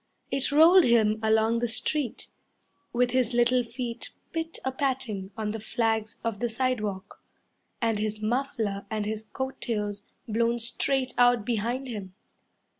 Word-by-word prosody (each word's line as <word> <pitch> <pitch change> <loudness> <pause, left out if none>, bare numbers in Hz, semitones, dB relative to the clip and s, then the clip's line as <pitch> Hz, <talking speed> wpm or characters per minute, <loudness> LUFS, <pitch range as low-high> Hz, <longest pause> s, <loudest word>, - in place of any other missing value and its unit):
It 270 0 0
rolled 335 +5 +7
him 220 -2 +4
along 220 +1 +3
the 240 - 0
street, 245 +3 -1 0.6
With 245 0 +2
his 255 -2 +1
little 245 +1 +4
feet 235 0 -5 0.2
pit 325 0 -3
a 265 - +1
patting 255 -8 -2
on 215 -1 -2
the 220 - -4
flags 220 0 -1
of 225 -3 -2
the 240 +1 0
sidewalk, 215 -6 -2 0.6
And 225 -2 +1
his 215 0 -2
muffler 220 -4 -1
and 215 -1 -2
his 215 +1 -3
coat 265 +4 -5
tails 210 -3 -2 0.3
blown 230 +2 +1
straight 255 +3 0
out 245 -3 +5
behind 240 +4 -1
him. 200 -6 -6
230 Hz, 145 wpm, -27 LUFS, 215-255 Hz, 0.6 s, rolled